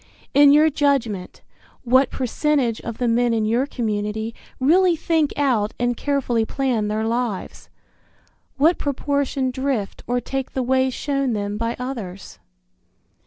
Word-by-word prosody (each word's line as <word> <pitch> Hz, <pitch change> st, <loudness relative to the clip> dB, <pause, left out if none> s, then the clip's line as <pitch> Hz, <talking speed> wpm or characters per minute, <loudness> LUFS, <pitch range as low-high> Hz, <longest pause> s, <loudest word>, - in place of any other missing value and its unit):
In 285 Hz, 0 st, +7 dB
your 305 Hz, +2 st, +5 dB
judgment, 265 Hz, -10 st, -1 dB, 0.4 s
what 260 Hz, +2 st, +4 dB
percentage 260 Hz, -2 st, 0 dB
of 230 Hz, -1 st, -6 dB
the 245 Hz, -, 0 dB
men 235 Hz, 0 st, +2 dB
in 220 Hz, -1 st, 0 dB
your 235 Hz, +5 st, +1 dB
community 220 Hz, -2 st, -3 dB, 0.3 s
really 345 Hz, +6 st, +4 dB
think 320 Hz, -2 st, +1 dB
out 240 Hz, -7 st, +1 dB
and 245 Hz, 0 st, +1 dB
carefully 255 Hz, -4 st, 0 dB
plan 240 Hz, -3 st, -1 dB
their 215 Hz, +1 st, -1 dB
lives? 230 Hz, -4 st, -3 dB, 0.9 s
What 320 Hz, +5 st, +3 dB
proportion 280 Hz, -2 st, -1 dB
drift 260 Hz, -6 st, -2 dB
or 245 Hz, +1 st, +1 dB
take 265 Hz, +2 st, -4 dB
the 260 Hz, -, -1 dB
way 260 Hz, +1 st, +2 dB
shown 275 Hz, -1 st, -1 dB
them 205 Hz, -1 st, -2 dB
by 230 Hz, +2 st, -2 dB
others? 225 Hz, -8 st, -7 dB
250 Hz, 135 wpm, -22 LUFS, 225-280 Hz, 0.9 s, In